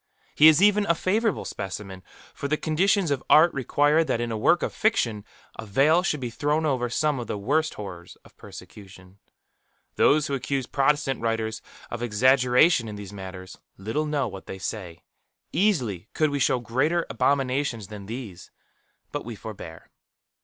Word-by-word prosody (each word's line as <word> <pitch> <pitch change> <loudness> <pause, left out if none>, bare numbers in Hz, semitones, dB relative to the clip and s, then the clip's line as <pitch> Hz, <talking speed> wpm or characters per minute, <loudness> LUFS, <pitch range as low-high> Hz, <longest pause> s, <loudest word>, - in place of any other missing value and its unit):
He 155 - +7
is 160 +4 +6
even 210 0 +4
a 170 - +3
favourable 210 +5 0
specimen; 95 -1 -6 0.3
for 140 - -5
the 155 +2 0
conditions 175 +2 +1
of 135 -2 -1
art 165 +3 +6
require 145 +4 +2
that 130 -6 -1
in 120 -1 -2
a - - -2
work 170 +11 +2
of - - -2
fiction 120 - 0 0.4
a - - -4
veil 145 - +3
should 155 -5 -1
be 125 -2 -5
thrown 150 +5 0
over 130 -5 0
some 150 +2 0
of 120 - -6
the - - -3
worst 150 +10 0
horrors 90 -4 -9
of - - -19
persecution. 95 -1 -13 0.8
Those 150 0 +4
who 140 - -4
accuse 135 -1 -2
Protestant 140 0 0
writers 110 -1 -2 0.3
of 120 - -5
exaggeration 125 +4 +3
in 105 - -6
these 100 -1 -9
matters, 95 -1 -9 0.2
little 110 +11 -2
know 145 -4 -1
what 95 -2 -10
they 95 - -6
say. 90 -4 -6 0.5
Easily 125 - 0
could 155 -2 +2
we 145 - -2
show 130 - +2
greater 145 +9 0
abominations 130 -6 -1
than 105 -2 -9
these; 110 -6 -8 0.6
but - - -4
we 115 0 -7
forbear. 95 -6 -10
130 Hz, 165 wpm, -25 LUFS, 105-155 Hz, 0.8 s, He